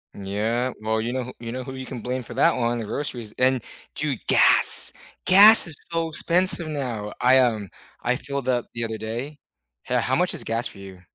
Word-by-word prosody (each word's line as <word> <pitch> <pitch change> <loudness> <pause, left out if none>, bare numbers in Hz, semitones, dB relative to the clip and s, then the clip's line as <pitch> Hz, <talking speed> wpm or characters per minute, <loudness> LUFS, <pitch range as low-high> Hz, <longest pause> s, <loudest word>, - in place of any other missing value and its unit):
Yeah. 110 +6 -3
Well, 110 +1 -2
you 115 +2 -4
know 130 0 -3
who 125 - -10
you 115 -1 -8
know 130 +1 -6
who 130 +1 -9
you 130 -1 -9
can 125 -4 -8
blame 125 +2 -4
for 120 -1 -10
that 135 - +2
one, 120 -1 -2
the 115 - -6
groceries, 120 -2 -5
and, 130 -2 +1 0.3
dude, 145 -5 -3
gas. - - +5 0.3
Gas 205 +4 +8
is 160 -4 +1 0.2
so 165 0 -2
expensive 170 +2 +4
now. 125 -9 -5
I, 130 +1 +4
um, 110 -6 -1 0.3
I 125 - 0
filled 140 0 -6
up 125 -2 -1
the 115 - -4
other 110 -1 -5
day. 120 +7 -7 0.5
Ho - - -1
how - - -1
much - - 0
is - - 0
gas 115 +2 -3
for - - -13
you? 95 -2 -13
125 Hz, 210 wpm, -22 LUFS, 115-140 Hz, 0.5 s, Gas